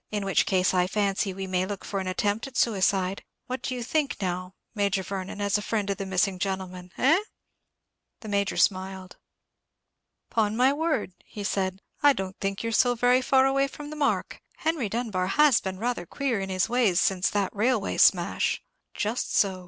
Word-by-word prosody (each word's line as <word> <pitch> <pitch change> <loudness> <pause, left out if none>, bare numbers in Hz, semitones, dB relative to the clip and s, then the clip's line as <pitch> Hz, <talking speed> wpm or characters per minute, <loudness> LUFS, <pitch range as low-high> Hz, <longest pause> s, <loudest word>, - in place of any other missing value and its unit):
In 205 -2 -3
which 195 - +2
case 185 -1 +2
I 180 -1 +2
fancy 200 0 0
we 190 +1 -5
may 185 0 -1
look 200 -1 -6
for 200 - -3
an 190 - -4
attempt 205 +6 -1
at 265 - -8
suicide. 195 -3 +1 0.2
What 255 +1 -4
do 255 - -3
you 245 - -4
think, 295 +3 0
now, 185 -1 -3 0.2
Major 200 -3 0
Vernon, 195 +1 -5
as 205 0 +1
a - - -5
friend 210 -1 -1
of 195 - -3
the 195 -2 -4
missing 190 0 +1
gentleman, 185 -2 -4
eh?" 310 +8 +4 1.0
The 220 - -9
Major 200 -1 0
smiled. 190 -1 0 1.1
"Upon 220 -1 +1
my 260 +3 +4
word," 295 - -1
he 205 - -8
said, 190 -1 -2 0.2
"I 290 -1 +6
don't 190 -4 -5
think 195 +1 -2
you're 230 - -2
so 245 +2 +3
very 245 +2 +3
far 265 0 +4
away 275 +1 +2
from 295 +2 -9
the - - -6
mark. 295 -2 -1 0.2
Henry 315 -9 -1
Dunbar 210 -5 -1
has 290 +4 +4
been 190 -1 -4
rather 230 -5 -2
queer 270 -6 -1
in 195 0 -4
his 185 0 +1
ways 230 -7 +2
since 190 -1 +2
that 200 -1 -1
railway 220 0 +1
smash." 175 -2 +3 0.3
"Just 220 +3 -2
so. 190 -3 +2
200 Hz, 190 wpm, -26 LUFS, 190-245 Hz, 1.1 s, I